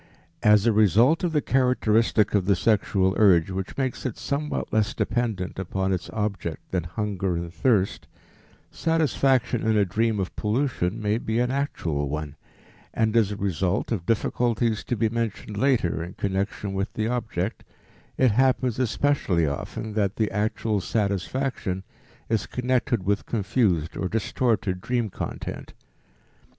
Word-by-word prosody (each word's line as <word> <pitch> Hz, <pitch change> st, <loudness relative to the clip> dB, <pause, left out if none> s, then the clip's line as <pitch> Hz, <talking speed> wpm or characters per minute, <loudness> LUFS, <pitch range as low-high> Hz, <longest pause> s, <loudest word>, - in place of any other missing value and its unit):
As 105 Hz, 0 st, +5 dB
a 115 Hz, -, +4 dB
result 110 Hz, -, +4 dB
of 175 Hz, -, +1 dB
the 150 Hz, -2 st, +1 dB
characteristic 115 Hz, -4 st, +2 dB
of 100 Hz, -3 st, +2 dB
the 100 Hz, 0 st, +3 dB
sexual 95 Hz, -1 st, +2 dB
urge 95 Hz, -4 st, +5 dB
which 95 Hz, 0 st, -5 dB
makes 130 Hz, -2 st, -2 dB
it 125 Hz, -, -3 dB
somewhat 150 Hz, +1 st, -3 dB
less 110 Hz, -1 st, +1 dB
dependent 110 Hz, -7 st, -1 dB
upon 95 Hz, +1 st, -1 dB
its 90 Hz, -, -3 dB
object 100 Hz, -6 st, -4 dB
than 90 Hz, -3 st, -1 dB
hunger 95 Hz, 0 st, -2 dB
and 85 Hz, 0 st, -5 dB
thirst, 100 Hz, +2 st, +1 dB, 0.6 s
satisfaction 135 Hz, -6 st, +1 dB
in 110 Hz, -1 st, +2 dB
a 100 Hz, -, +4 dB
dream 110 Hz, +3 st, 0 dB
of 95 Hz, -, -3 dB
pollution 110 Hz, -4 st, -1 dB
may 105 Hz, +1 st, 0 dB
be 110 Hz, -1 st, -2 dB
an 125 Hz, +1 st, +1 dB
actual 85 Hz, -, -2 dB
one, 75 Hz, 0 st, -4 dB, 0.6 s
and 110 Hz, 0 st, +1 dB
as 110 Hz, -3 st, +3 dB
a -, -, -3 dB
result 95 Hz, 0 st, -1 dB
of 90 Hz, -7 st, -2 dB
difficulties 115 Hz, 0 st, +1 dB
to 120 Hz, -, -1 dB
be 110 Hz, -, +2 dB
mentioned 110 Hz, -2 st, -3 dB
later 105 Hz, -9 st, +1 dB
in 90 Hz, +2 st, -8 dB
connection 100 Hz, +1 st, -2 dB
with 95 Hz, +2 st, -2 dB
the 110 Hz, 0 st, -1 dB
object, 115 Hz, -5 st, -2 dB, 0.5 s
it 130 Hz, -3 st, +4 dB
happens 130 Hz, 0 st, +2 dB
especially 120 Hz, -, +1 dB
often 75 Hz, +9 st, -4 dB
that 105 Hz, -2 st, 0 dB
the 110 Hz, -2 st, 0 dB
actual 105 Hz, 0 st, 0 dB
satisfaction 100 Hz, 0 st, -1 dB, 0.4 s
is 115 Hz, -3 st, 0 dB
connected 125 Hz, -3 st, 0 dB
with 100 Hz, +1 st, 0 dB
confused 100 Hz, -7 st, 0 dB
or 95 Hz, -, -2 dB
distorted 110 Hz, -3 st, 0 dB
dream 120 Hz, -3 st, -1 dB
content. -, -, -6 dB
105 Hz, 145 wpm, -25 LUFS, 95-120 Hz, 0.6 s, As